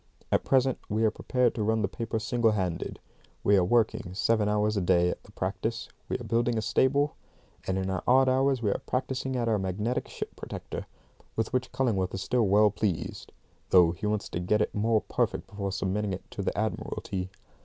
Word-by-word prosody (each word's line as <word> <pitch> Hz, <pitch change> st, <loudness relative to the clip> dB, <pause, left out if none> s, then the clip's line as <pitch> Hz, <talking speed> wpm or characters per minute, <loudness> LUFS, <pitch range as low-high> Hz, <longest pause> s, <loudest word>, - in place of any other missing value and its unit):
At -, -, +3 dB
present 130 Hz, -1 st, +2 dB
we 110 Hz, +2 st, +1 dB
are 110 Hz, -, +3 dB
prepared 125 Hz, +2 st, +1 dB
to 110 Hz, -, -3 dB
run 110 Hz, +1 st, +1 dB
the -, -, +2 dB
paper 115 Hz, +3 st, -3 dB
single 115 Hz, 0 st, +2 dB
handed; 90 Hz, -5 st, -2 dB, 0.4 s
we 100 Hz, -, +5 dB
are 95 Hz, -, +4 dB
working 100 Hz, -3 st, +1 dB
seven 105 Hz, +1 st, +2 dB
hours 105 Hz, +1 st, +1 dB
a 100 Hz, -, +1 dB
day 90 Hz, -1 st, +3 dB
at -, -, -7 dB
the 105 Hz, -, -18 dB
practice; 105 Hz, +4 st, -3 dB, 0.2 s
we -, -, 0 dB
are 125 Hz, -, -8 dB
building 115 Hz, +1 st, +1 dB
a -, -, +1 dB
stable; 140 Hz, +6 st, +2 dB, 0.5 s
and 95 Hz, -, 0 dB
in 95 Hz, 0 st, -1 dB
our 95 Hz, -, -1 dB
odd 130 Hz, +1 st, +5 dB
hours 130 Hz, -1 st, +2 dB
we 105 Hz, -, +2 dB
are -, -, -2 dB
practising 130 Hz, +1 st, -2 dB
at 120 Hz, -2 st, 0 dB
our 110 Hz, -2 st, +2 dB
magnetic 100 Hz, +6 st, -2 dB
ship -, -, -6 dB
protector, -, -, -6 dB, 0.5 s
with 115 Hz, 0 st, -1 dB
which 130 Hz, 0 st, 0 dB
Cullingworth 100 Hz, -9 st, 0 dB
is 95 Hz, -, -3 dB
still 120 Hz, 0 st, +2 dB
well 105 Hz, +2 st, +5 dB
pleased, 100 Hz, -4 st, -3 dB, 0.4 s
though 90 Hz, -3 st, +6 dB
he 85 Hz, +4 st, -4 dB
wants 105 Hz, -1 st, -1 dB
to -, -, -3 dB
get 90 Hz, +4 st, +1 dB
it 105 Hz, -, 0 dB
more 110 Hz, +1 st, +2 dB
perfect -, -, -1 dB
before 100 Hz, -1 st, -4 dB
submitting 100 Hz, +1 st, -1 dB
it 95 Hz, -, -5 dB
to -, -, -4 dB
the -, -, -2 dB
Admiralty. 95 Hz, -1 st, -3 dB
105 Hz, 205 wpm, -28 LUFS, 95-120 Hz, 0.5 s, though